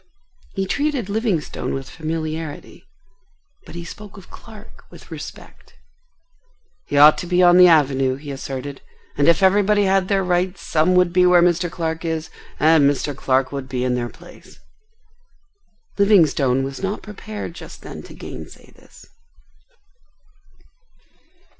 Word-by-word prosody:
He 195 - -1
treated 280 -1 -2
Livingstone 205 - -2
with 135 -1 -6
familiarity, 155 -1 -6 0.8
but - - -11
he 170 0 -7
spoke 205 +4 -11
of 190 - -15
Clark 215 -2 -14
with - - -16
respect. - - -11 1.1
"He 145 - -2
ought 150 +2 +7
to 175 - -6
be 180 +1 +2
on 175 0 +6
the 180 0 +8
Avenue," 135 -5 +3
he 145 +1 -9
asserted; 135 0 -6 0.3
"and 145 - +1
if 170 +3 +4
everybody 205 +2 +3
had 190 -1 +2
their 195 -1 +1
rights 180 +1 -1
some 165 +4 +1
would 180 -1 +3
be 180 0 +4
where 175 -1 +5
Mr. 175 0 +1
Clark 165 -1 -4
is 160 -1 -3 0.3
and 155 -2 +5
Mr. 145 0 -2
Clark 130 0 0
would 140 -2 -6
be 125 -1 -2
in 125 -1 0
their 120 -1 -2
place." - - -16 1.4
Livingstone 155 -10 +3
was 135 0 -6
not 195 +2 -3
prepared 210 -3 -8
just - - -12
then - - -9
to - - -13
gainsay - - -11
this. - - -19
170 Hz, 140 wpm, -20 LUFS, 145-190 Hz, 1.4 s, the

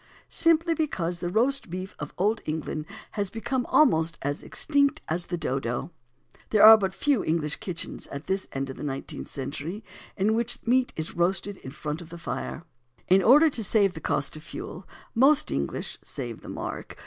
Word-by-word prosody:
Simply 330 0 +3
because 180 - -2
the 175 - -2
Roast 250 +5 +1
Beef 185 +2 -6
of - - -5
Old 210 +4 +1
England 155 0 -3 0.2
has 200 -3 -2
become 245 +3 -2
almost 165 - +4
as 145 +1 -2
extinct 285 -2 +1
as 170 +2 -2
the 175 - -2
Dodo. 135 0 -2 0.6
There 215 -1 +6
are 220 +1 +12
but 195 -3 0
few 285 -2 +2
English 155 -2 0
kitchens, 175 -4 -5
at 140 +2 -7
this 190 0 -1
end 135 0 -3
of - - -10
the - - -7
nineteenth 135 -2 -5
century, 150 - -5 0.3
in 195 - +1
the 215 - +3
which 235 +1 -1
meat 250 +2 +3
is 160 0 -4
roasted 190 +3 0
in 130 - -9
front 150 +3 -5
of 165 - -11
the 170 - -8
fire. 165 -1 -5 0.5
In 190 +1 +6
order 290 - +7
to 230 - 0
save 200 -2 +3
the 160 - -8
cost 145 - -1
of 155 - -9
fuel, 350 - -8 0.3
most 270 +5 +4
English 70 0 -3
(save 120 -4 -6
the - - -10
mark!) - - -6
185 Hz, 185 wpm, -27 LUFS, 155-230 Hz, 0.6 s, are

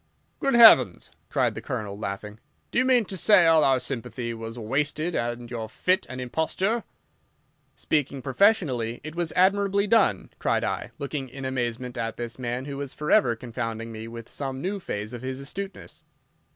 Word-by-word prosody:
"Good 275 -2 +1
heavens!" 135 - +7 0.2
cried - - +1
the - - -6
Colonel, 100 -2 -4
laughing, 105 +1 -6 0.3
"do - - +2
you 255 - +3
mean 250 -3 +4
to 195 - -5
say 190 -1 +5
all 160 -2 +5
our 135 -1 +4
sympathy 120 -1 -4
was 115 +1 -7
wasted 145 +8 -1
and 120 -1 -3
your 110 -2 -4
fit 185 - 0
an 130 +1 -6
imposture?" 175 - -1 0.9
"Speaking 140 -3 -1
professionally, 135 - +2
it 155 +1 -7
was 170 -1 -2
admirably 200 +2 +3
done," 205 - +2
cried - - +1
I, - - -2
looking 140 -2 -4
in 135 +2 -7
amazement 125 -1 -3
at 115 0 -3
this 120 +1 -5
man 125 +1 -3
who 140 -1 -5
was 140 -2 -5
forever 130 -5 +3
confounding 115 -1 -5
me 110 0 -7
with 115 0 -9
some 135 -2 -4
new 195 +6 -2
phase 105 - -5
of 120 - -6
his 130 0 -4
astuteness. 195 +8 -7
130 Hz, 170 wpm, -26 LUFS, 115-175 Hz, 0.9 s, heavens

